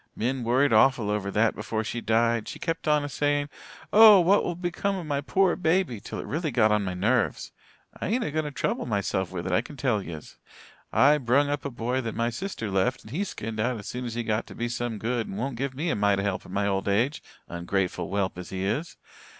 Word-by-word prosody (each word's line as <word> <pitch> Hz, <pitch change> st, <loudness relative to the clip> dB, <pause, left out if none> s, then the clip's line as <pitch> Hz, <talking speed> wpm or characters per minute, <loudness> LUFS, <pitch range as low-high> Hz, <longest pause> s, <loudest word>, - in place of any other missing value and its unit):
"Min 125 Hz, +3 st, -1 dB
worried 130 Hz, +3 st, +3 dB
awful 110 Hz, -1 st, +4 dB
over 105 Hz, -2 st, -1 dB
that 105 Hz, +3 st, +2 dB
before 110 Hz, -1 st, -3 dB
she 120 Hz, +2 st, -4 dB
died. 115 Hz, 0 st, +1 dB
She -, -, -6 dB
kept 165 Hz, -2 st, -3 dB
on 150 Hz, -1 st, +3 dB
a -, -, -3 dB
saying 145 Hz, +1 st, 0 dB, 0.4 s
'Oh, 215 Hz, -2 st, +9 dB
what 185 Hz, +4 st, +4 dB
will 175 Hz, -, -2 dB
become 180 Hz, +3 st, -2 dB
of 180 Hz, -3 st, -5 dB
my 145 Hz, -2 st, -1 dB
pore 190 Hz, +5 st, +2 dB
baby' 165 Hz, -, +1 dB
till -, -, -7 dB
it -, -, -5 dB
really 160 Hz, +2 st, -2 dB
got 115 Hz, -4 st, +3 dB
on 105 Hz, -1 st, +2 dB
my 95 Hz, -2 st, -3 dB
nerves. 110 Hz, +4 st, 0 dB, 0.5 s
I -, -, -1 dB
ain't 235 Hz, +5 st, 0 dB
a 150 Hz, -, -3 dB
going 155 Hz, +1 st, -1 dB
to -, -, -3 dB
trouble 135 Hz, -, -2 dB
myself 100 Hz, -4 st, -1 dB
with 90 Hz, -2 st, -5 dB
it, -, -, -2 dB
I -, -, +3 dB
can 140 Hz, +4 st, -12 dB
tell 120 Hz, -7 st, +1 dB
yez. 80 Hz, -5 st, -9 dB, 0.5 s
I 150 Hz, +2 st, +5 dB
brung 135 Hz, +3 st, +2 dB
up 145 Hz, 0 st, -2 dB
a -, -, -1 dB
boy 125 Hz, +1 st, -2 dB
that 115 Hz, -3 st, -5 dB
my 115 Hz, +1 st, 0 dB
sister 120 Hz, -, -4 dB
left 100 Hz, +7 st, 0 dB
and 110 Hz, -, -13 dB
he 175 Hz, +9 st, -1 dB
skinned 110 Hz, -, -5 dB
out 120 Hz, +2 st, 0 dB
as 100 Hz, -, -9 dB
soon 125 Hz, 0 st, -4 dB
as 115 Hz, -1 st, -5 dB
he 120 Hz, -, -2 dB
got 110 Hz, -1 st, -1 dB
to -, -, -11 dB
be 120 Hz, 0 st, -2 dB
some 120 Hz, -1 st, -3 dB
good 115 Hz, +2 st, -2 dB
and 95 Hz, -, -6 dB
won't 130 Hz, +3 st, -3 dB
give 130 Hz, +2 st, -3 dB
me 165 Hz, +5 st, -1 dB
a -, -, 0 dB
mite 100 Hz, -1 st, +2 dB
o' -, -, -1 dB
help 100 Hz, -2 st, -2 dB
in -, -, -12 dB
my 100 Hz, +1 st, 0 dB
old 95 Hz, -1 st, -1 dB
age, 120 Hz, +9 st, +1 dB, 0.3 s
ungrateful 90 Hz, +2 st, -2 dB
whelp 95 Hz, -2 st, -1 dB
as 90 Hz, -, -8 dB
he 95 Hz, 0 st, -3 dB
is. 140 Hz, +12 st, -2 dB
120 Hz, 250 wpm, -26 LUFS, 105-145 Hz, 0.5 s, Oh